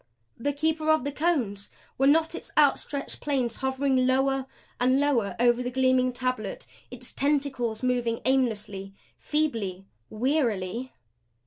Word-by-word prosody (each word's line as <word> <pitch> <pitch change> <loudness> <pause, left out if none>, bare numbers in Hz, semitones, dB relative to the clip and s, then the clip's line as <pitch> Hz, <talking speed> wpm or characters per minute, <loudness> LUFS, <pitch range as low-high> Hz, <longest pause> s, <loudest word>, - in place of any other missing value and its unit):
The 285 +5 -1
Keeper 310 +2 0
of 315 -4 +4
the 285 - -2
Cones! 270 - -1 0.3
Were 270 - +4
not 320 +3 +4
its - - -7
outstretched 285 -1 +1
planes 260 -5 -1
hovering 265 -1 +1
lower 270 0 +1 0.3
and 255 +2 +3
lower 260 -8 +1
over 240 0 +4
the 250 - -2
gleaming 255 0 +2
tablet; 250 -5 -3 0.2
its 250 0 -8
tentacles 270 -5 0
moving 245 -2 0
aimlessly, 210 -7 0 0.2
feebly 225 -12 -1 0.2
wearily? 235 -3 -1
255 Hz, 125 wpm, -27 LUFS, 235-280 Hz, 0.3 s, of